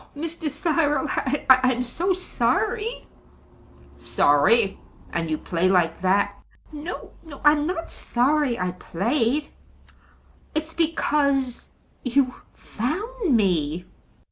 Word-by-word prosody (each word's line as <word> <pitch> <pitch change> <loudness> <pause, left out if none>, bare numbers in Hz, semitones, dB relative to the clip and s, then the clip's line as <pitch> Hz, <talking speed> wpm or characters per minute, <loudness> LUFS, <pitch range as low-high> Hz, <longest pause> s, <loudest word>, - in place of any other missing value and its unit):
"Oh, - - -10
Mr. 325 0 -3
Cyril 295 0 +1 0.4
I'm 255 -1 +5
so 335 +10 -1
sorry!" 425 +5 -1 0.9
"Sorry! 195 +9 +3 0.3
and 165 -1 -1
you 155 - 0
play 175 +3 0
like 175 -3 +2
that!" 190 +2 +1 0.3
"No, 310 +4 -7
no; 300 -4 -11
I'm 295 0 +5
not 335 -2 -4
sorry 260 0 +1
I 180 0 -1
played. 230 - -1 1.1
It's 315 +1 -2
because 285 -5 0 0.3
you 255 0 +2 0.2
found 375 - -2
me." 175 -4 0
275 Hz, 100 wpm, -24 LUFS, 200-315 Hz, 1.1 s, I'm